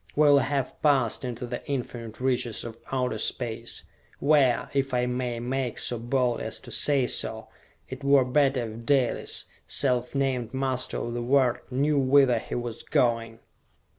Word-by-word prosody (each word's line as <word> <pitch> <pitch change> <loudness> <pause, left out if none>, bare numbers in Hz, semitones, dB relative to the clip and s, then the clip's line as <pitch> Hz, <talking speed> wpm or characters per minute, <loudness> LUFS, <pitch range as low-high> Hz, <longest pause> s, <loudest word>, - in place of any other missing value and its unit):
We 150 - +4
will 145 -1 +7
have 140 -1 -2
passed 135 -7 +2
into 125 -1 -4
the 120 0 -5
infinite 120 -4 -4
reaches 125 -3 -1
of 115 -1 -8
Outer 125 -4 -1
Space, 115 0 -3 0.3
where, 140 -4 +3
if 135 -2 0
I 125 0 +2
may 125 -1 -2
make 125 0 -2
so 120 - -1
bold 120 0 0
as - - -3
to - - -11
say 140 -3 +2
so, - - -1 0.4
it 130 +2 -8
were 140 -2 +5
better 135 -2 +2
if 110 +1 -9
Dalis, 130 0 0 0.2
self 125 -1 +1
named 130 -3 -1
master 130 -1 -1
of 120 - -3
the 120 - -2
world, 125 0 +2
knew 140 +3 +1
whither 135 -2 +4
he - - -6
was 120 -2 -4
going!" 115 -2 0
125 Hz, 165 wpm, -27 LUFS, 120-135 Hz, 0.4 s, will